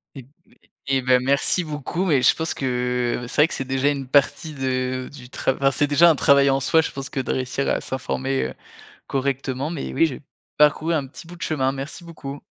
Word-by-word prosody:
Et 135 - -8
b - - -21 0.6
et 135 -1 +2
bah 125 0 +4
merci 140 +7 +1
beaucoup 155 +4 -2
et 130 -3 +3
je - - +5
pense 160 0 -2
que 125 -1 -1
c'est - - -8
vrai 160 - +5
que - - -6
c'est 135 - -3
déjà 135 +1 0
une 140 -2 -3
partie 145 +4 +1
de 130 -1 -2
du 125 -3 -12
trav 130 - -1
enfin 135 0 +2
c'est 145 +3 +1
déjà 165 +4 +6
un 165 - +5
travail 140 -1 +4
en 135 0 +2
soi, 160 +4 +3
je 160 - -3
pense 135 -1 -6
que - - -5
de 130 - -1
réussir 130 +1 -2
à - - +1
s'informer, 135 0 -2
heu, - - -5 0.5
correctement, 135 +1 -2
mais 165 -4 -5
oui, 165 - +3
j'ai 145 -1 -7 0.4
parcouru 150 +2 +3
un 145 - -1
petit 140 +5 -12
bout 175 - -10
de 170 - -7
chemin, 135 -4 0
merci 140 +5 -7
beaucoup. 145 -4 -8
135 Hz, 225 wpm, -22 LUFS, 130-150 Hz, 0.6 s, déjà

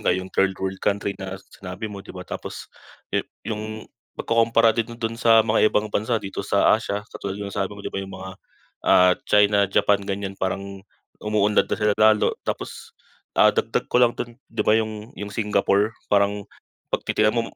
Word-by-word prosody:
nga - - +2
yong 95 0 -6
third 95 -1 +2
world 95 0 -4
country 100 0 0
na 95 0 -5 0.2
sinabi 90 +2 -7
mo, 100 - -7
'di 95 - -17
ba. 90 - -7
Tapos - - -7 0.4
yu - - +2 0.2
yung 110 0 -5 0.3
pagkukumpara 115 0 +3
din 115 +1 -3
do'n 115 -1 -2
sa 115 -2 +6
mga 110 -1 +4
ibang 105 0 -1
bansa 110 +3 +1
dito 100 -2 -5
sa 100 0 +3
Asia, 105 -1 -1
katulad 100 0 -5
yung 100 -1 -6
sabi 95 -1 -1
mo, 100 - -11
'di - - -5
ba? 95 - -2
Yung 95 0 -8
mga, 95 0 -7 0.6
ah, 90 0 +6 0.2
China, 105 -1 +4
Japan 100 +1 +3
ganyan, 100 0 -4
parang 100 +1 -3 0.4
umuunlad 105 -1 +2
na - - -1
sila 105 -1 +2
lalo. 110 0 +5 0.2
Tapos, - - -5 0.4
ah, - - +6
dagdag - - -1
ko 125 - +4
lang 120 -1 +4
do'n, 120 +2 -6
'di 115 - -2
ba - - +4
yung 110 +1 -1
yung 105 - -4
Singapore 105 0 +1 0.2
parang 100 0 +1 0.4
'pag - - -2
titignan 105 +2 +2
mo 115 - +2
105 Hz, 190 wpm, -23 LUFS, 100-110 Hz, 0.6 s, sa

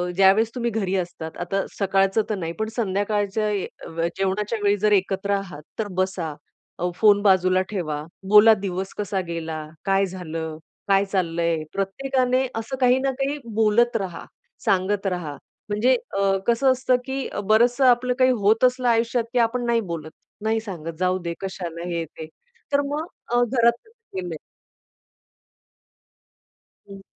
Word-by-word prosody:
ज्यावेळेस 195 +4 +5
तुम्ही 235 -1 -1
घरी 195 -3 -1
असतात, 170 -3 -5
आता 195 +3 -1
सकाळचं 195 +1 +2
तर 215 - 0
नाही, 165 -3 -4
पण 220 - 0
संध्याकाळच्या 205 0 0 0.7
जेवणाच्या 205 +3 -1
वेळी 205 0 +3
जर 210 +1 +2
एकत्र 195 +1 +1
आहात, 175 -7 -7 0.2
तर 215 - -1
बसा 180 -5 -2 0.5
अ, 180 +1 0
फोन 205 -2 +5
बाजूला 185 -2 +4
ठेवा, 155 -7 -3 0.3
बोला, 210 +1 +8
दिवस 190 -1 -3
कसा 200 -2 -1
गेला, 160 -2 -4 0.2
काय 195 0 +3
झालं, 165 -4 -5 0.3
काय 195 0 +4
चाललंय, 170 -4 0
प्रत्येकाने 255 +5 0
असं 225 +4 -3
काही 250 +1 +5
ना 270 0 0
काही 280 +2 0 0.2
बोलत 225 +2 +3
रहा, 185 -5 -5 0.4
सांगत 195 +1 +1
राहा. 175 -5 -3 0.4
म्हणजे 235 +5 +3 0.2
अ, 195 -1 +3
कसं 255 +3 +4
असतं 255 0 +2
की 265 0 -3 0.2
बरंचसं 240 +5 +4
आपलं 250 0 +4
काही 255 0 +5
होत 220 +4 +4
असलं 250 0 +3
आयुष्यात, 230 +1 +2
की 245 - +2
आपण 245 +1 -3
नाही 235 -1 +2
बोलत, 155 -1 -6 0.3
नाही 220 +1 +1
सांगत, 165 -6 -6
जाऊदे 180 -2 0
कशाला 175 -3 -5
हे, 170 -1 -1
ते. 160 +1 -10 0.5
तर 280 - +4
मग 305 +2 -2 0.3
अ, 245 0 +4
घरात 235 -1 +3
केलंय 190 - -7 2.5
हं. 195 0 -10
200 Hz, 145 wpm, -23 LUFS, 185-235 Hz, 2.5 s, बोला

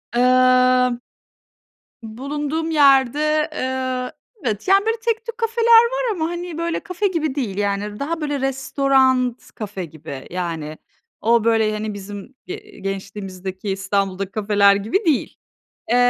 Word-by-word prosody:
Imm. 255 0 +4 1.0
Bulunduğum 290 +8 -3
yerde, 295 +1 +4
eee, 255 -2 -2 0.3
evet, 220 - -2
yani, 395 +2 +5
böyle 450 +1 +1
tek 455 0 0
tük 465 -1 -6
kafeler 455 0 0 0.2
var. - - -1
Ama, 325 -5 -2
hani, 345 -1 -5
böyle, 335 0 -1
kafe 405 0 -2
gibi 320 -7 -1
değil, 235 -9 -3
yani 205 +1 -2
daha 325 +4 -2
böyle, 290 -2 -2
restoran 265 -2 +1
kafe 205 -4 -5
gibi. 145 -4 -9
Yani, 165 -4 -4 0.4
o 230 0 +3
böyle, 225 -2 +3
hani, 215 0 -3
bizim, 200 +4 -9
eee, 420 +2 -9
gençliğimizdeki, 195 0 -5
İstanbul'daki 195 0 -1
kafeler 200 -1 +3
gibi 220 - -1
değil. 315 -6 0 0.5
Eee, 240 - +4
255 Hz, 130 wpm, -21 LUFS, 205-315 Hz, 1.0 s, yani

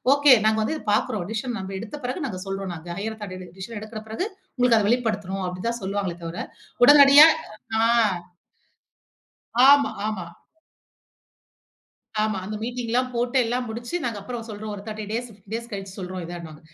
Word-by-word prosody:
Okay 285 -1 +7
நாங்க 220 0 +2
வந்து 310 - -1
இத - - -11
பாக்கிறோம். 210 -3 0
டிசிஷன் 230 +2 -3
நாம 190 0 -6
எடுத்த 225 +8 -7
பிறகு 260 +5 -2
நாங்க 185 -7 -5
சொல்றோம் 195 -1 -4
நாங்க. 165 +1 -10
ஹையர் 220 +2 -4
ஆதாரிட்டி 185 -3 -7
டிசிஷன் 210 +4 -7
எடுக்கிற 215 0 -7
பிறகு 225 - -2 0.3
உங்களுக்கு 250 -2 +4
அத 210 - +1
வெளிப்படுத்துறோம் 205 -6 -1
அப்டி 180 0 -6
தான் 235 0 -4
சொல்லுவாங்களே 195 -2 -2
தவிர, 165 +1 -5 0.5
உடனடியா 285 +2 +9 0.6
ஆங் 225 -6 +3 1.5
ஆமா, 280 0 +5 0.2
ஆமா. 205 -5 -3 2.0
ஆமா. 215 -2 0
அந்த 210 +3 -5
மீட்டிங்லாம் 245 +1 -1
போட்டு 240 +2 -1
எல்லாம் 245 +2 -1
முடிச்சு 235 +6 -6
நாங்க 230 -4 -2
அப்புறம் 240 +1 -6
சொல்றோம். 215 0 -6
ஒரு 200 - -7
30 215 0 -6
டேஸ், 240 +2 -2
15 200 +1 -16
டேஸ் 235 +1 -4
கழிச்சு 195 -2 -6
சொல்றோம் 185 -1 -5
இதனுவாங்க. 165 -3 -8
215 Hz, 160 wpm, -24 LUFS, 195-240 Hz, 2.0 s, உடனடியா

